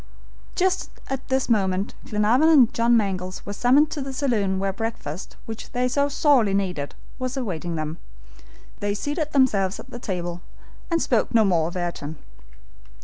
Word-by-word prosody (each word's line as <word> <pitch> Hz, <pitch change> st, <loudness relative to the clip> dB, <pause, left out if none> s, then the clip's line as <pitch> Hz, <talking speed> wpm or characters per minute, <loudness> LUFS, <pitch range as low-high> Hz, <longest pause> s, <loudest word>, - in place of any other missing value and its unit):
Just 370 Hz, 0 st, +1 dB, 0.2 s
at 270 Hz, -1 st, -3 dB
this 265 Hz, 0 st, +1 dB
moment 195 Hz, -4 st, +1 dB
Glenarvan 225 Hz, +9 st, +3 dB
and 270 Hz, -8 st, +6 dB
John 235 Hz, 0 st, +4 dB
Mangles 185 Hz, -3 st, -2 dB
were 205 Hz, -, -4 dB
summoned 265 Hz, +8 st, +4 dB
to 295 Hz, -, -3 dB
the 270 Hz, 0 st, -4 dB
saloon 220 Hz, -8 st, 0 dB
where 195 Hz, 0 st, -1 dB
breakfast, 210 Hz, -7 st, -5 dB
which 225 Hz, -1 st, -8 dB
they 250 Hz, +1 st, +1 dB
so 280 Hz, +3 st, +1 dB
sorely 270 Hz, -8 st, +3 dB
needed, 180 Hz, -8 st, -2 dB, 0.2 s
was 255 Hz, +1 st, -3 dB
awaiting 175 Hz, -9 st, -3 dB
them. 155 Hz, +1 st, -4 dB, 0.8 s
They 205 Hz, 0 st, -1 dB
seated 295 Hz, -, -2 dB
themselves 210 Hz, -9 st, +2 dB
at -, -, -11 dB
the 240 Hz, -, -7 dB
table 175 Hz, -5 st, -4 dB, 0.5 s
and 335 Hz, -1 st, +2 dB
spoke 235 Hz, -1 st, +1 dB
no 220 Hz, -2 st, +6 dB
more 170 Hz, -5 st, +2 dB
of 175 Hz, -, -5 dB
Ayrton. 165 Hz, -3 st, -4 dB
215 Hz, 160 wpm, -24 LUFS, 185-260 Hz, 0.8 s, and